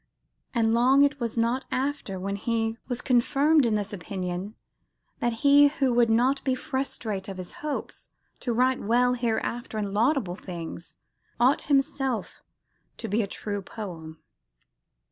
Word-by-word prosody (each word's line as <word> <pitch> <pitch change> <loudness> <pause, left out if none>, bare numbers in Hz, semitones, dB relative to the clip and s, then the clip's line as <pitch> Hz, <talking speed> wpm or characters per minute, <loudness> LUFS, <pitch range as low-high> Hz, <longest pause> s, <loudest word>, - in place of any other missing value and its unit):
"And 225 -1 +3
long 260 +4 +5
it 285 0 +1
was 235 -1 -3
not 235 +3 +1
after" 260 -8 -2
when 200 +2 -3
he 225 +1 -1
"was 245 -1 -2
confirmed 275 +3 +3
in 220 - +1
this 205 0 -3
opinion, 185 +1 -5 0.6
that 240 - +1
he 285 +1 +8
who 275 -3 0
would 235 -1 +4
not 250 +5 +2
be 260 -2 +1
frustrate 230 -7 -3
of 195 -2 -6
his 185 -1 -7
hope 300 -1 -3 0.5
to 245 - -2
write 255 +2 +2
well 245 +3 +3
hereafter 235 -1 -2
in 205 -2 -2
laudable 220 - +1
things, 170 -2 -8 0.4
ought 255 +4 +2
himself 270 -3 0 0.6
to - - -5
be 210 +4 +1
a 200 - -2
true 205 +1 -4
poem." 170 -6 -8
235 Hz, 145 wpm, -26 LUFS, 205-260 Hz, 0.6 s, he